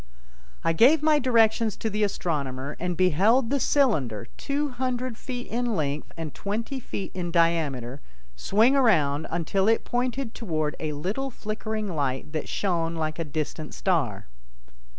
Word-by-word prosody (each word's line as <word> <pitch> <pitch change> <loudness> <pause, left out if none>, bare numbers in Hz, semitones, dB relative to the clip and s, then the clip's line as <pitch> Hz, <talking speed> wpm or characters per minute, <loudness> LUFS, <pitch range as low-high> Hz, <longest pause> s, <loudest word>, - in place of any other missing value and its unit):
I 165 - +2
gave 275 - +5
my 305 -1 +5
directions 225 -3 +3
to - - -3
the 215 0 -2
astronomer, 140 -8 -2
and 180 -1 -2
beheld 205 - +3
the 280 - +2
cylinder, 150 - +2
two 290 +1 -1
hundred 255 -1 -2
feet 245 +1 -6
in 240 0 -1
length 145 -3 -2
and 160 -2 -5
twenty 225 +7 -3
feet 200 -5 -5
in 180 -2 -3
diameter, 155 -7 +1 0.3
swing 220 - +3
around 160 - +3
until 175 +4 0
it 225 0 +3
pointed 245 0 -1
toward 155 -8 -2
a 155 -1 -2
little 200 - -2
flickering 215 -2 -4
light 140 0 -2
that 155 - -3
shone 170 -4 0
like 155 0 -2
a - - 0
distant 155 0 -4
star. 125 - 0
190 Hz, 150 wpm, -26 LUFS, 155-240 Hz, 0.3 s, gave